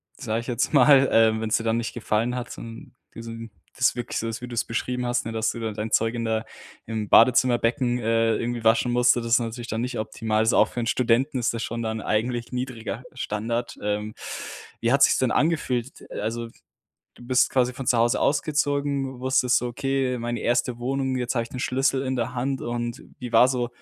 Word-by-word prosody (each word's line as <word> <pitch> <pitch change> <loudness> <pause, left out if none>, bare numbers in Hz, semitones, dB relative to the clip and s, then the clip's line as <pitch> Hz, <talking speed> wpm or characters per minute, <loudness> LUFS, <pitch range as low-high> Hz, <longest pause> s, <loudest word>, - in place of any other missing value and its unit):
sage 115 -3 -2
ich 120 - -12
jetzt 125 +3 -1
mal. 135 -1 +6
Ähm, 110 -1 +4
wenn's 110 -1 +1
dir 115 - -4
dann 115 0 +1
nicht 115 - -3
gefallen 115 +1 -1
hat, 125 -1 -5
son 115 +2 -10 0.2
diesen 115 -1 -8 0.3
das 125 - +3
wirklich 120 -1 -4
so 115 - -3
ist, 115 +1 -5
wie 125 - -7
du - - -8
es 115 - 0
beschrieben 125 +2 -2
hast, 120 0 0
ne, 115 - -4
dass 110 0 0
du 115 - -7
da 110 -1 -2
dein 110 +1 -5
Zeug 115 +1 +2
in 115 -1 -3
der 110 0 -1 0.4
im 110 -2 -3
Badezimmerbecken, 120 +1 +4
äh, 115 0 +2
irgendwie 120 0 -3
waschen 115 +2 +3
musst, 120 0 +4
so 120 - -2
das 115 0 -5
ist - - +6
natürlich 115 0 -5
dann 110 - -2
nicht 125 +1 -3
optimal. 110 0 -2
Also, 110 +1 +3
auch 110 - +5
für 120 - -4
'n - - -2
Studenten 125 +3 +1
ist 120 -1 0
das 115 - -3
schon 115 0 -4
dann 110 -1 -3
eigentlich 120 +3 -1
niedriger 125 -3 -4
Standard. 115 0 -3
Ähm, 105 +1 -2 0.7
wie 115 - +1
hat 140 +1 +5
sich's - - +5
denn 130 -2 +1
angefühlt, 135 -5 0
äh, - - -6
also, 115 +2 -3 0.7
du 120 - -14
bist 125 0 +3
quasi 125 -1 +1
von 135 -1 -7
zu 120 - +3
Hause 120 +2 +3
ausgezogen, 140 -3 0
wusstest 130 -1 +3
so: 125 - -3
„Okay, 135 +1 -1
meine 120 -1 -3
erste 120 0 0
Wohnung, 130 +1 -1
jetzt 125 +1 -2
habe 115 - +1
ich 115 - -10
den 125 - -6
Schlüssel 135 +1 +1
in 130 -1 -2
der 125 +1 -2
Hand.“ 135 +2 -2
Und 120 0 -4 0.2
wie 125 -2 -6
war 115 +2 +7
so 125 -2 -1
120 Hz, 220 wpm, -24 LUFS, 115-125 Hz, 0.7 s, war